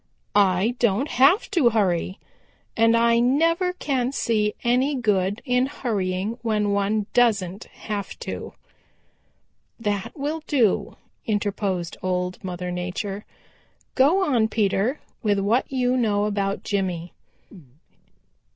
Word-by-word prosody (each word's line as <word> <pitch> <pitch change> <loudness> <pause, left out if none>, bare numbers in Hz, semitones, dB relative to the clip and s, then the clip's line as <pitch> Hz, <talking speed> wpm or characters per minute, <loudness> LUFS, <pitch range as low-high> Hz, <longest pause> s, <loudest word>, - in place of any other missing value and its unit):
I 200 +2 +3
don't 235 +5 +1
have 275 - +4
to 330 -12 +4
hurry, 190 -4 0 0.6
and 230 +1 +4
I 235 0 +4
never 330 +9 +2
can 265 -8 -1
see 215 -5 0
any 255 +4 +2
good 205 -3 0
in 250 0 +2
hurrying 205 -3 -2
when 210 -3 0
one 200 +1 0
doesn't 205 -5 +1
have 205 -2 -6
to." - - -6 1.3
"That 205 +3 -3
will 300 +3 -3
do," 245 -9 +1 0.3
interposed 200 -4 -2
Old 180 0 -2
Mother 180 -1 -4
Nature. 185 +3 -4 0.7
"Go 310 +9 +4
on, 240 -8 +2
Peter, 215 +5 0 0.2
with 205 -3 +1
what 210 +8 +1
you 250 -1 +1
know 210 -4 +1
about 200 -1 -1
Jimmy." 180 -4 -2
215 Hz, 115 wpm, -24 LUFS, 195-250 Hz, 1.3 s, have